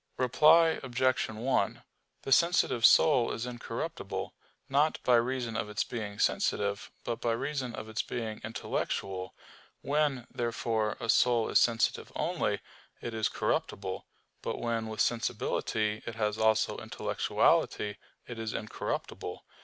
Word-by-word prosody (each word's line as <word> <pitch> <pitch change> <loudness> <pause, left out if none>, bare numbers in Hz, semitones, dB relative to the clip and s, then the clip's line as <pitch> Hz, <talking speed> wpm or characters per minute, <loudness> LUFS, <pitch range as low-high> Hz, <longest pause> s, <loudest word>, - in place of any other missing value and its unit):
Reply 150 +6 +5
Obj. 130 0 +1
1: 115 0 -1 0.4
The 135 - -5
sensitive 140 -7 +5
soul 130 -7 +5
is 115 - -3
incorruptible, 120 -1 -5 0.3
not 145 +3 +2
by 125 - +3
reason 120 -1 -1
of 105 - -2
its 105 - 0
being 105 -4 -5
sensitive, 100 0 0
but 115 -1 -3
by 115 - +1
reason 130 0 -3
of - - -7
its 110 +2 -1
being 110 -3 -5
intellectual. 95 -4 -3 0.5
When, 145 -4 0
therefore, 115 -2 -1
a - - -4
soul 120 0 +3
is - - +5
sensitive 115 -1 +1
only, - - -1 0.4
it 120 - -5
is 110 -1 0
corruptible; 95 -1 -2 0.3
but - - -3
when 115 -1 -2
with 110 -1 -2
sensibility 110 -2 0
it 115 - -4
has 105 -1 -1
also 110 0 +2
intellectuality, 105 -1 +1 0.3
it 120 -2 -7
is 110 -1 -3
incorruptible. 110 - -4
115 Hz, 130 wpm, -30 LUFS, 110-125 Hz, 0.5 s, Reply